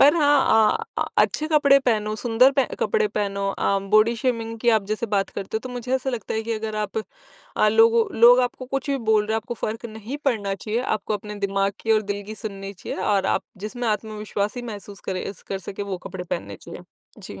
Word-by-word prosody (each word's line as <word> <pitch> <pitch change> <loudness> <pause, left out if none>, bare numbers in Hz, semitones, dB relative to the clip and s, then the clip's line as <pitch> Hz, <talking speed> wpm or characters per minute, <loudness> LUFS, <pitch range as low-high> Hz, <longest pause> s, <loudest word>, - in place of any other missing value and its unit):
पर 290 +4 +7
हाँ, 275 -8 +4 0.2
अ - - +2
अ, - - -5 0.2
अच्छे 310 - -1
कपड़े 285 -3 +5
पहनो 215 -5 0
सुंदर 240 +3 +4
पह 270 -1 +3 0.2
कपड़े 445 -2 +2
पहनो 200 - -2
अ, 195 - +2
बॉडी 215 +2 +5
शेमिंग 230 -1 -2
की 240 - +1
आप 220 -3 +3
जैसे 215 +2 -2
बात 195 -1 +1
करते 200 +2 -4
हो - - -2
तो 255 - -7
मुझे 250 +1 -3
ऐसा 265 0 -1
लगता 235 -4 -4
है 220 - -1
कि 230 +1 -3
अगर 215 -1 -3
आप 210 +1 -2 0.6
अ, 215 - +4
लोगों 225 +1 +5 0.2
लोग 245 +2 +8
आपको 250 +1 -2
कुछ 275 +2 -2
भी 275 - +1
बोल 210 -1 +4
रहे 220 - -1
हैं - - +2
आपको 225 +2 -4
फ़र्क 225 +2 -3
नहीं 220 +4 -7
पड़ना 205 -7 0
चाहिए। 215 +4 -2
आपको 215 -3 -1
अपने 210 0 -6
दिमाग 195 0 0
की 225 - +2
और 215 0 +3
दिल 205 - -6
की 215 - -6
सुननी 195 -3 -6
चाहिए 190 0 -7
और 195 -2 +2
आप - - -5 0.2
जिसमें 240 +1 -3
आत्मविश्वासी 210 +1 -2
महसूस 205 -1 -10
करें 185 - -2 0.2
स 200 - -20
कर 195 - -2
सके 195 +1 -6
वो 195 -2 -4
कपड़े 185 -2 -6
पहनने 100 - -4
चाहिए। - - -9 0.4
जी। 95 - -9
220 Hz, 225 wpm, -23 LUFS, 205-245 Hz, 0.6 s, लोग